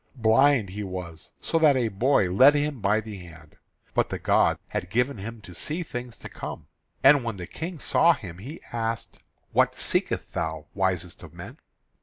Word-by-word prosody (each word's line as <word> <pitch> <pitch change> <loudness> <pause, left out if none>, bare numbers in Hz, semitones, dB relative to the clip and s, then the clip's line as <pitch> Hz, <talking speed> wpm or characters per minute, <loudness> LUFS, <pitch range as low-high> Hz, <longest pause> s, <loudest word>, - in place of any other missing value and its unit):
Blind 120 -1 +4
he 100 +3 -6
was, 90 -4 -7
so 165 - 0
that 150 -3 +5
a 125 -3 +1
boy 110 0 +2
led 130 +11 +6
him 145 -2 -1
by 105 +2 +2
the 110 -2 -8
hand; 80 -4 -14 0.4
but - - +1
the - - -3
gods - - +2
had 90 - -4
given 125 +3 0
him 115 +3 -7
to 95 -3 -12
see 155 - -2
things 125 -5 -7
to - - -9
come. - - -7 0.4
And 135 -1 +7
when 115 -4 -4
the 90 - -6
King 165 - -6
saw 170 +3 +4
him 90 -8 -10
he 140 - -9
asked: 115 -1 -3 0.3
"What - - +3
seekest - - -1
thou, 80 -1 -3
wisest 95 -3 -1
of - - -12
men?" - - -10
110 Hz, 185 wpm, -26 LUFS, 95-135 Hz, 0.4 s, And